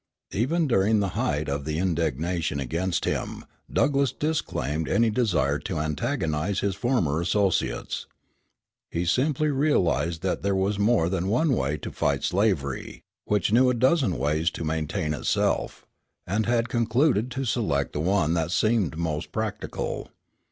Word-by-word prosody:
Even 155 - +1
during 110 -2 +3
the 100 -1 0
height - - -1
of 70 0 -2
the 75 +1 -2
indignation 85 -2 -1
against 85 +7 -1
him - - -3 0.3
Douglass 140 -2 +2
disclaimed 80 - -2
any 115 -1 +3
desire 85 - +1
to 80 +3 -4
antagonize 75 +4 -1
his 100 -1 0
former 95 - 0
associates. 90 - 0 0.8
He 85 +1 -2
simply 145 - +1
realized 115 - +1
that 95 - -1
there 100 0 0
was 100 +2 0
more 105 -5 +3
than 95 0 -1
one 130 +8 +2
way 75 - 0
to - - -7
fight - - 0
slavery, 90 -9 -1 0.2
which 105 -2 +1
knew 125 +2 +5
a 125 - +1
dozen 130 - +2
ways 75 +5 +1
to 85 - -6
maintain 75 -1 -1
itself, 75 - -1 0.4
and 105 +4 -1
had 120 0 +2
concluded 120 +1 +2
to 135 +1 -3
select 105 - 0
the - - -2
one 85 -1 +2
that 85 -1 0
seemed 105 -4 +1
most 80 -2 -3
practical. 110 -2 -4
95 Hz, 145 wpm, -26 LUFS, 80-115 Hz, 0.8 s, knew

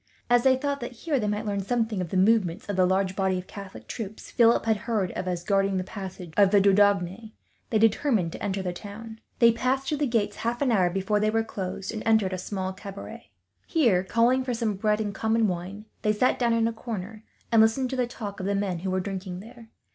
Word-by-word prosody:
As 245 0 +6
they 260 +1 +5
thought 280 +1 -2
that 240 +1 -6
here 300 -5 +1
they 210 - -1
might 210 +1 -2
learn 200 -1 -1
something, 220 -1 -1
of 175 - -4
the 190 - -1
movements 195 -2 +2
of 205 - -2
the 185 -1 +4
large 190 0 +1
body 190 -1 +1
of 180 - -6
Catholic 200 -1 -10
troops 215 -2 -7
Philip 235 -1 +4
had 220 -1 +2
heard 210 -4 -1
of 185 - -5
as 175 -1 -2
guarding 195 0 +1
the 185 - -1
passages 185 -3 -8
of 200 -2 +6
the 205 0 +5
Dordogne, 200 +1 +2 0.4
they 220 - +2
determined 220 - +2
to - - -9
enter 195 -1 -2
the 180 -1 -2
town. 220 +4 -9 0.2
They 235 -1 +6
passed 260 +3 -1
through 300 0 -1
the 295 - +1
gates, 210 -4 0
half 235 +1 -2
an 260 - +2
hour 185 -5 +3
before 195 +3 0
they 215 +1 +2
were 225 +1 +1
closed, 195 -3 -5
and 220 - -4
entered 220 -4 +2
a 185 - -3
small 190 0 -4
cabaret. 195 +1 -9 0.4
Here, 235 - +3
calling 235 +6 +2
for 250 -2 -2
some 225 -2 -1
bread 210 +2 0
and 210 -2 -2
common 220 +2 +1
wine, 185 +3 -5 0.2
they 210 - +2
sat 250 +5 +1
down 235 -2 +2
in 230 0 +2
a 230 - -2
corner, 220 -2 -6 0.3
and 225 -1 +6
listened 245 +4 +2
to - - -2
the 250 -2 0
talk 210 -4 -7
of 190 - -3
the 200 - +1
men 195 -3 -1
who 190 +2 -3
were 185 0 0
drinking 185 -1 -5
there. 230 +2 -13
210 Hz, 240 wpm, -26 LUFS, 190-230 Hz, 0.4 s, As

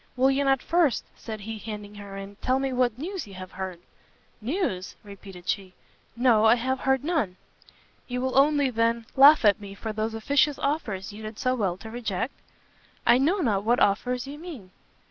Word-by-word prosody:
"Will 265 +2 +4
you 275 +1 +1
not 270 -2 +2
first," 335 -7 +2
said 220 -2 -7
he, 220 +1 -6
handing 210 -1 -7
her 200 -1 -9
in, 195 +1 -8
"tell 255 +4 +1
me 270 -1 -1
what 245 -2 +1
news 355 - -5
you 195 - -11
have 185 0 -8
heard?" 185 -2 -6 0.6
"News?" 235 - -2
repeated 195 -3 -12
she. 190 -2 -2 0.4
"No, 235 -3 +4
I 220 - +7
have 260 +2 -1
heard 265 0 +1
none!" 290 - -1 0.7
"You 250 0 -3
will 260 0 -1
only, 285 -1 +4
then, 230 0 +1
laugh 280 -1 +8
at 205 0 +4
me 200 -1 -9
for 220 +2 -5
those 220 +1 -2
officious 285 +5 +2
offers 215 -10 -2
you 210 - -9
did 215 0 -7
so 255 - +1
well 195 -8 -1
to 220 +3 -10
reject?" 230 0 -3 0.7
"I 245 - +6
know 345 +9 +2
not 205 - +1
what 240 +3 +2
offers 245 +5 +1
you 285 +2 -8
mean!" 290 - -9
230 Hz, 190 wpm, -26 LUFS, 205-270 Hz, 0.7 s, laugh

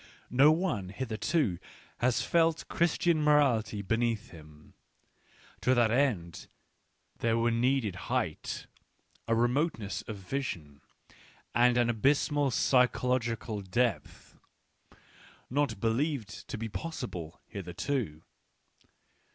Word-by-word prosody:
No 135 +5 +6
one 155 - -1
hitherto 110 - -1 0.4
has 125 0 +2
felt 165 -1 +2
Christian 170 -1 +1
morality 135 -9 +3
beneath 115 +2 -1
him; 75 -2 -15 0.9
to 130 - +3
that 120 -2 +3
end 110 - 0 0.7
there 115 0 +1
were 115 0 +2
needed 115 -4 +1
height, - - -2 0.6
a 115 - +2
re 120 +1 +4
moteness 120 - -1
of 110 - -4
vision, 90 - -5 0.7
and 120 0 +4
an 120 -1 +3
abysmal 140 +4 +2
psychological 125 -3 +1
depth, 115 +6 -2 1.1
not 135 -6 0
believed 115 0 -1
to - - -5
be 115 +1 -4
possible 110 - -6
hitherto. 95 - -4
120 Hz, 100 wpm, -30 LUFS, 105-140 Hz, 1.1 s, No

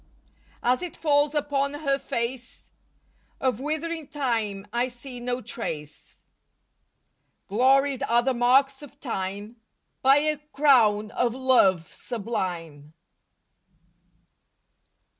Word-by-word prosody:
As 250 +1 +2
it 360 -2 -6
falls 290 -1 +2
upon 285 -1 0
her 280 -2 0
face 235 +1 -5 0.7
Of 255 -4 0
withering 315 +2 -3
time 225 -8 -2
I 240 +1 +1
see 250 0 -9
no 245 +1 -3
trace. 155 -10 -7 1.2
Gloried 265 +5 +3
are 235 +1 +4
the 265 +1 +1
marks 270 +3 +3
of 285 -1 -13
time 205 -2 -5 0.4
By 270 +1 +6
a 305 +1 +1
crown 255 -8 +3
of 240 0 0
love 215 -11 +3
sublime. 175 -10 -5
250 Hz, 100 wpm, -25 LUFS, 220-280 Hz, 1.2 s, By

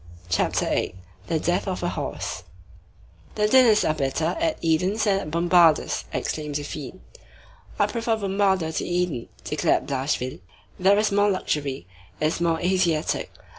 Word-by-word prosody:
CHAPTER 90 - +1
VIII—THE 95 - -3
DEATH 175 +3 0
OF 185 -2 -3
A 175 - +1
HORSE - - -4 0.9
"The 210 0 +2
dinners 230 -2 +5
are 155 - +2
better 155 +3 -1
at 330 -1 0
Édon's 180 +7 +1
than 200 -3 +2
at 155 - -6
Bombarda's," 170 -1 +3
exclaimed 150 -2 -3
Zéphine. 145 +4 -6 0.8
"I - - +4
prefer 230 -1 -1
Bombarda 195 -5 +1
to - - -1
Édon," 175 -9 -1 0.2
declared - - +1
Blachevelle. 130 - -2 0.4
"There 195 +2 +5
is 215 0 +2
more 205 +1 +3
luxury. 145 - -2 0.3
It - - 0
is 160 +2 0
more 165 -1 +1
Asiatic. 175 -3 0
175 Hz, 140 wpm, -24 LUFS, 155-200 Hz, 0.9 s, dinners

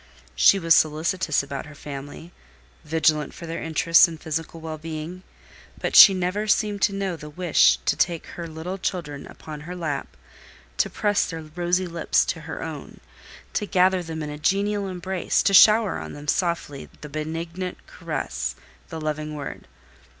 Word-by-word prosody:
She 195 - +6
was 165 -3 +4
solicitous 155 +1 +2
about 140 +1 -6
her 150 - -12
family, 145 +4 -9 0.5
vigilant 155 -2 +1
for 170 - -9
their 165 0 -5
interests 165 +1 +5
and 165 -2 -9
physical 160 +1 -4
well 160 -1 -6
being; 160 +3 -6 0.6
but - - -2
she 195 - +10
never 185 +4 -1
seemed 210 -1 +1
to 205 - +3
know 195 -3 -2
the 150 -2 -10
wish 175 +1 +4
to - - +2
take 170 -2 0
her 170 -1 -7
little 165 +4 -6
children 150 -7 -4
upon 155 -1 -9
her 175 +4 -7
lap, 160 -5 -4 0.6
to - - +2
press 205 -1 +1
their 165 -1 -6
rosy 175 +4 -1
lips 170 -1 +1
with - - -12
her - - -6
own, - - -8 0.5
to 210 - -1
gather 185 -1 +3
them 160 -2 -5
in 150 - -5
a 150 - -7
genial 200 +4 0
embrace, 185 0 -1
to 200 - +2
shower 215 +1 +6
on - - -7
them 145 0 -10
softly 170 -4 -1
the 150 - -7
benignant 165 +4 -5
caress, - - -4 0.3
the 165 -3 -6
loving 155 0 -3
word. 145 -2 -7
165 Hz, 165 wpm, -24 LUFS, 155-185 Hz, 0.6 s, she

